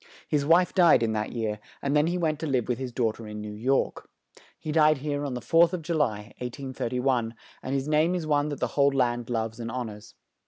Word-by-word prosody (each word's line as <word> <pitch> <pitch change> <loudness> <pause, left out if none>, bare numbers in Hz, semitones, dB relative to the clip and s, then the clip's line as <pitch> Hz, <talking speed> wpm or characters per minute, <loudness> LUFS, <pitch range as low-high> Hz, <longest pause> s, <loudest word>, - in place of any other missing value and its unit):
His 145 -2 +1
wife 175 +3 +4
died 170 -9 +5
in 110 - +1
that 105 -1 -2
year, 110 -3 -2 0.2
and 140 +1 -1
then 150 +1 +4
he 175 +1 0
went 155 -4 0
to 160 - -3
live 130 -5 0
with 125 0 -1
his 130 -2 -4
daugh 115 -3 0
ter 115 -1 -10
in 105 0 -7
New 105 0 -6
York. 130 +6 -1 0.5
He 155 - -5
died 155 -1 +4
here 145 +1 -3
on 135 -3 -3
the 125 - -4
4th 165 +6 +4
of 175 -3 -3
Ju 170 +2 -2
ly, 110 -9 -1
1831, 125 -2 -2 0.3
and 130 - -3
his 135 +1 -1
name 155 +4 +2
is 175 -3 -3
one 145 -1 +1
that 145 - -5
the - - -1
whole 140 -1 +4
land 120 -3 0
loves 115 -1 -2
and 115 0 -4
hon 120 -2 -4
ors. 105 0 -13
135 Hz, 240 wpm, -27 LUFS, 115-150 Hz, 0.5 s, died